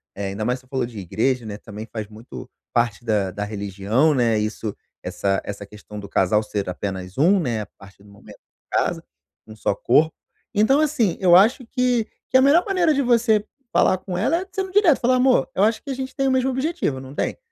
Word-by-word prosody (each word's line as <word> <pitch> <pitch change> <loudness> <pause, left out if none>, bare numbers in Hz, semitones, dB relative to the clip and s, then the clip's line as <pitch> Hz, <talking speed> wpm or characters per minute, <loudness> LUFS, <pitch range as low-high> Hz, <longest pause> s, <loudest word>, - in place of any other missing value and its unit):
eh, 100 0 -4
ainda 100 +2 -4
mais 125 +2 0
você 130 - -24
falou 130 -2 -1
de 115 -3 -9
igreja, 115 +7 -1
né, 105 -1 -6
também 105 0 -9
faz 110 -2 -5
muito 105 - -11 0.2
parte 120 -2 0
da 105 -4 0
da 105 +3 -4
religião, 105 +7 0
né, 120 -4 +2
isso 105 0 -3 0.3
essa 95 -1 -1
essa 100 0 -6
questão 105 +1 -12
do 100 - -8
casal 105 +3 +2
ser 100 -2 -3
apenas 95 +1 -5
um, 180 +8 +4
né, 120 -10 -1
a - - -5
partir 100 0 -16
do 105 - -18
momento 100 - -15 0.3
casa, - - 0 0.5
um 110 - -11
só 110 - -1
corpo. 155 +10 +2 0.4
Então 225 +7 +3
assim, 275 - +1
eu 175 -2 +6
acho 230 +6 +3
que 250 -2 +1 0.2
que 260 - +5
a - - +5
melhor 290 +6 +5
maneira 360 -5 +2
de 280 - +1
você 230 -4 +2 0.3
falar 185 - +3
com 185 -1 -6
ela 260 - +1
é - - -6
sendo 380 0 -3
direto 370 -7 +4
falar: 255 +1 +3
"Amor, 255 0 +3
eu 190 - +2
acho 220 +2 +2
que 280 - -10
a - - -1
gente 260 0 -6
tem 270 -2 0
o - - +2
mesmo 260 0 +2
objetivo, 265 - -1
não 130 +1 -10
tem?" - - -2
130 Hz, 220 wpm, -22 LUFS, -, 0.5 s, eu